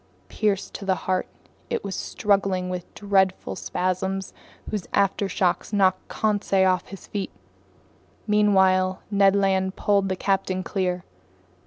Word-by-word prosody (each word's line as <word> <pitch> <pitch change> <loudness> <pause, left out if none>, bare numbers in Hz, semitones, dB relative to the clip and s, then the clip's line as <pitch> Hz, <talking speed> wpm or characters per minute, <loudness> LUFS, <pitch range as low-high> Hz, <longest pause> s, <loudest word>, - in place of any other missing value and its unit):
Pierced 200 -2 -1
to - - -7
the 190 -1 +1
heart, 185 -1 0 0.4
it - - -2
was 200 -1 -4
struggling 195 -3 0
with 180 -1 -5
dreadful 195 -2 +1
spasms 190 +1 -2 0.4
whose 210 -5 -3
aftershocks 195 -2 +1
knocked 190 -3 +2
Conseil 205 -3 +1
off 185 0 -2
his 195 - -10
feet. 200 -2 -4 1.0
Meanwhile 190 -3 +3
Ned 200 -1 +4
Land 190 -1 +1
pulled 200 -2 +2
the 185 - 0
captain 190 -1 0
clear. 180 -1 -1
190 Hz, 125 wpm, -24 LUFS, 185-200 Hz, 1.0 s, Ned